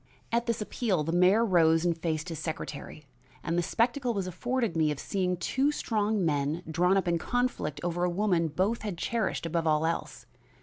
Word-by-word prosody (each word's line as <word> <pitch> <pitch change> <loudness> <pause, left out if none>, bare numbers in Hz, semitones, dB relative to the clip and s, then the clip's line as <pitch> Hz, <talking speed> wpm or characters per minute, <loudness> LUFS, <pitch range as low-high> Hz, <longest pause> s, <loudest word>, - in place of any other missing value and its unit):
At 235 +1 +1
this 230 -2 -1
appeal 200 -7 -1
the 165 - -2
mayor 185 +6 +4
rose 165 -4 +4
and 170 -1 +2
faced 160 0 -2
his 165 -3 -5
secretary 155 -2 -6 0.4
and 165 - -1
the 175 - +2
spectacle 240 +6 0
was 195 -2 -1
afforded 230 +2 -2
me 160 -2 +3
of 150 - -2
seeing 180 -2 -1
two 270 +10 +1
strong 215 -7 0
men 150 +2 0
drawn 180 +4 +2
up 190 - 0
in 170 -1 +1
conflict 245 - -1
over 175 0 -1
a 180 - +2
woman 175 -2 +1
both 190 +9 0
had 205 -5 -4
cherished 220 -1 -1
above 165 0 -1
all 155 0 +2
else. 165 - -3
175 Hz, 190 wpm, -29 LUFS, 165-215 Hz, 0.4 s, mayor